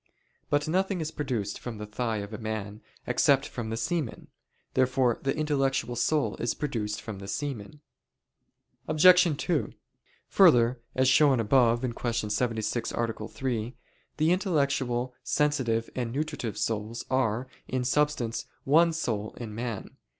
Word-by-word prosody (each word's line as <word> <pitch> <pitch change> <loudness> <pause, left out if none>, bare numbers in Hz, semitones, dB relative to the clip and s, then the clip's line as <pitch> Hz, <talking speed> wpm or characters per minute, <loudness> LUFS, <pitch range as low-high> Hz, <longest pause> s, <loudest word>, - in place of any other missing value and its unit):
But 145 +1 +1
nothing 190 +3 0
is 160 -1 -3
produced 120 -10 -3
from 120 -3 -6
the 105 - -6
thigh 110 +1 -2
of 105 - -12
a 110 - -5
man, 110 -1 -5 0.2
except 140 -1 +3
from 115 -3 -5
the 115 - -3
semen. 135 +1 -3 0.4
Therefore 130 -2 +2
the 135 +2 -1
intellectual 135 -5 0
soul 120 -2 +1
is 120 - -1
produced 110 -7 -3
from 110 -4 -7
the 100 - -8
semen. 140 +2 -5 1.1
Obj. 180 -1 +6
2: 165 -2 -1 0.6
Further, 125 -10 +5 0.2
as 130 0 +3
shown 135 -1 +5
above 120 +1 +3
(Q. 115 -3 -2
76, 115 +1 -1
A. 115 -2 -3
3), 120 -2 -3 0.4
the 155 +2 +3
intellectual, 140 -9 0
sensitive, 130 -7 +1
and 120 -3 -2
nutritive 140 -6 -3
souls 110 +2 -2
are, 125 -1 +1 0.2
in 130 -1 -1
substance, 130 -3 0 0.2
one 165 +4 +4
soul 110 -10 -2
in 115 -3 -6
man. 115 -2 -5
125 Hz, 135 wpm, -28 LUFS, 115-145 Hz, 1.1 s, Obj